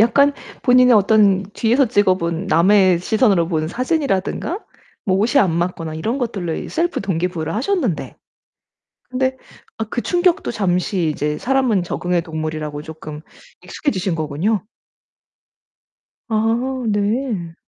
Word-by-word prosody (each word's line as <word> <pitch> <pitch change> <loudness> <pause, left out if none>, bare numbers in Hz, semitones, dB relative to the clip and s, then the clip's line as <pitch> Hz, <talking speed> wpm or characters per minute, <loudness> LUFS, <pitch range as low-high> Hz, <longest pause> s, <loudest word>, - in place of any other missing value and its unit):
약간 280 +6 +4 0.3
본인의 250 -1 +6
어떤 200 -2 +4
뒤에서 245 +4 +2
찍어 205 -4 +3
본 170 +1 -3
남의 185 +1 +4
시선으로 195 -4 +2
본 155 -2 -1
사진이라든가 275 - -1 0.4
뭐 190 -1 +2
옷이 240 +7 +3
안 185 -8 +2
맞거나 170 -2 -2
이런 220 - -2
것들로 195 -10 -3
셀프 345 +1 -1
동기 180 -2 -1
부여를 165 -2 -4
하셨는데, 255 - -1 0.9
근데 260 +1 -1 0.4
아 225 - -1
그 240 - -2
충격도 355 +2 +1
잠시 180 -4 0
이제 150 0 -2
사람은 255 -7 +1
적응의 175 0 -1
동물이라고 155 -2 -4
쪼끔 155 -1 -9 0.4
익숙해지신 190 - -2
거군요. 160 +7 -1 1.7
아 235 +4 0
네. 205 -4 -1
200 Hz, 280 characters per minute, -19 LUFS, 170-245 Hz, 1.7 s, 본인의